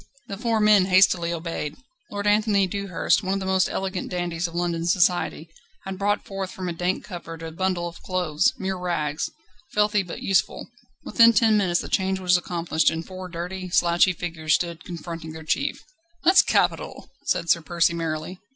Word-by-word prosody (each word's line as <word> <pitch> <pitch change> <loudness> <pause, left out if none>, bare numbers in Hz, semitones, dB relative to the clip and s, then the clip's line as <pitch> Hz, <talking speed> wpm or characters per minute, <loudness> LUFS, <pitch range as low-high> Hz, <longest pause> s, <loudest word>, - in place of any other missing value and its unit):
The 200 - -4
four 225 +1 0
men 210 -3 +5
hastily 185 -2 +4
obeyed. 165 -3 -4 0.3
Lord 205 0 -4
Anthony 205 -1 +3
Dewhurst 195 0 0
one 190 -1 -1
of - - -1
the 190 - -5
most 190 0 +2
elegant 190 -1 -3
dandies 175 -1 -2
of 170 - -11
London 170 -1 -1
society 175 -2 +1 0.4
had 190 -1 -6
brought 205 +1 0
forth 195 -1 -5
from 185 -1 -6
a 175 - -2
dank 180 +2 -1
cupboard 165 -4 -8
a 165 - -6
bundle 180 0 -1
of 170 - -10
clothes, 175 -5 +1
mere 190 -1 -3
rags, 155 -4 -2 0.4
filthy 210 0 +3
but 180 -3 -8
useful. 195 - 0 0.4
Within 230 0 +5
ten 220 0 +4
minutes 185 -4 +2
the - - -7
change 190 -1 0
was 180 -1 +3
accomplished, 170 -2 +1
and 165 0 -4
four 185 -1 -8
dirty, 180 +2 -5
slouchy 175 +1 +3
figures 160 -2 -1
stood 170 -2 -3
confronting 165 -2 -7
their 160 0 -9
chief. 280 - -1 0.4
"That's 370 +3 +7
capital!" - - -1 0.2
said 170 - +1
Sir 170 - +3
Percy 170 0 +1
merrily. 165 +2 -4
180 Hz, 180 wpm, -24 LUFS, 170-195 Hz, 0.4 s, That's